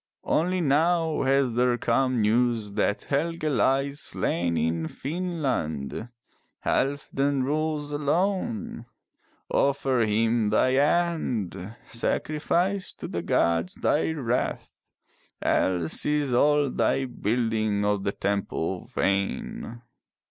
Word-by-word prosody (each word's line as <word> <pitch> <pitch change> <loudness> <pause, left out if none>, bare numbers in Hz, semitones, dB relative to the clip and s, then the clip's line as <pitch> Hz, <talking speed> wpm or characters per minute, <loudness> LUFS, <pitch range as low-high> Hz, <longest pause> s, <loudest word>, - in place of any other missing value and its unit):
Only 180 +3 +1
now 160 +2 +2
has 135 -2 +2
there 120 +1 +2
come 125 0 +1
news 115 -1 +1
that 105 +1 0
Helge 165 +4 -1
lies 140 -1 +1
slain 85 - 0
in 80 +1 0
Finnland. 130 - -3 0.6
Halfdan 140 0 0
rules 150 +1 -1
alone. 150 - -1 0.6
Offer 135 -2 +2
him 110 0 +2
thine 130 +5 +3
hand. 130 - 0
Sacrifice 170 +10 -1
to - - -7
the - - -3
gods 85 +1 +1
thy 150 - +1
wrath. 125 -5 -2 0.7
Else 90 -3 +1
is 150 -3 +1
all 145 +2 +3
thy 135 - +1
building 110 -3 0
of 105 -1 +1
the 100 - 0
temple 100 -3 -2
vain." 100 +4 -2
130 Hz, 100 wpm, -26 LUFS, 105-150 Hz, 0.7 s, thine